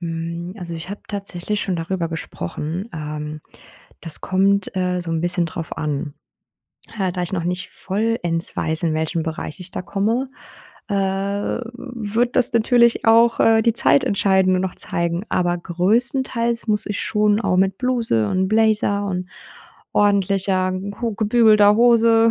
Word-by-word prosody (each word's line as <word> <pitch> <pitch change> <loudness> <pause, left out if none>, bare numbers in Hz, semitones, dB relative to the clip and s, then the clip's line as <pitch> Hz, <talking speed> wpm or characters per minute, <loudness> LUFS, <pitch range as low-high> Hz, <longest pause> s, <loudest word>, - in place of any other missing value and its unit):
Hm, 170 +1 -5
also, 175 -3 -6
ich 165 +2 -7
habe 205 - -6
tatsächlich 200 0 -3
schon 185 -3 -2
darüber 170 +1 -2
gesprochen, 165 - -5
ähm, 150 0 -6 0.6
das 165 -3 -3
kommt, 195 +1 +1
äh, 180 -1 0
so 175 -1 -6
’n 165 -1 -1
bisschen 175 0 0
drauf 165 0 -6
an. 145 -1 -3 0.8
Äh, 190 -3 0
da 180 - -3
ich 175 - -3
noch 175 -3 -2
nicht 180 +1 -3
vollends 190 -5 0
weiß, 160 0 -1
in 160 - +1
welchen 160 +1 -1
Bereich 160 0 -5
ich 180 0 -6
da - - -5
komme, 225 +8 -1 0.6
äh, 205 - -2
wird 220 +4 -2
das 255 +1 +2
natürlich 235 +1 +3
auch, 230 +1 +5
äh, 225 0 +5
die 230 0 +2
Zeit 140 - +3
entscheiden 190 -2 +2
und 185 - 0
noch 190 - -3
zeigen, 170 +2 -2
aber 175 -1 0
größtenteils 235 - 0
muss 210 -1 +1
ich 205 -1 -3
schon 210 0 +1
auch 185 -5 +1
mit 190 0 +2
Bluse 235 - 0
und 185 - 0
Blazer 215 -1 +2
und 180 -1 -3 0.6
ordentlicher, 195 -2 +2
gut 200 +4 -4
gebügelter 215 -2 +5
Hose, 230 -1 +5
195 Hz, 155 wpm, -21 LUFS, 170-220 Hz, 0.8 s, auch